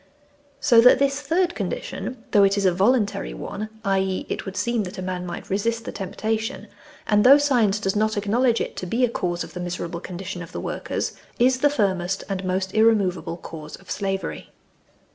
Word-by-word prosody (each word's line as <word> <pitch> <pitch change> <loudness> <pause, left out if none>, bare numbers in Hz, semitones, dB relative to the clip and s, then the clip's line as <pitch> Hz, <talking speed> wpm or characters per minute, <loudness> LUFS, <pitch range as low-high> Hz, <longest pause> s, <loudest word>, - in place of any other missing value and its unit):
So 235 -5 +6
that 250 - +7
this 275 +1 +1
third 340 +5 +1
condition, 255 - -5
though 205 - +6
it 195 +1 +3
is 200 - +1
a 185 - +5
voluntary 200 - +1
one 205 - -5 0.2
(i.e. 190 -1 0
it - - -4
would 195 +1 -6
seem 235 +3 0
that 185 +3 -8
a - - -4
man 180 -1 -4
might 175 - -7
resist 230 +4 -1
the - - -4
temptation), 220 +3 -3 0.4
and 210 0 +3
though 275 +3 +9
science 240 -8 +2
does 195 -1 -1
not 215 0 +1
acknowledge 230 +4 +2
it - - -4
to 185 - -4
be 240 +7 +2
a - - -2
cause 175 -6 -2
of - - -11
the 180 - -6
miserable 175 -1 -4
condition 180 0 -6
of 165 - -10
the - - -4
workers, - - -3 0.2
is 255 +1 +3
the 290 - +4
firmest 195 -7 0
and 195 -1 -2
most 185 +1 -1
irremovable 190 -7 +2
cause 155 -3 -9
of 190 - -13
slavery. 195 -1 -3
200 Hz, 195 wpm, -23 LUFS, 185-230 Hz, 0.4 s, though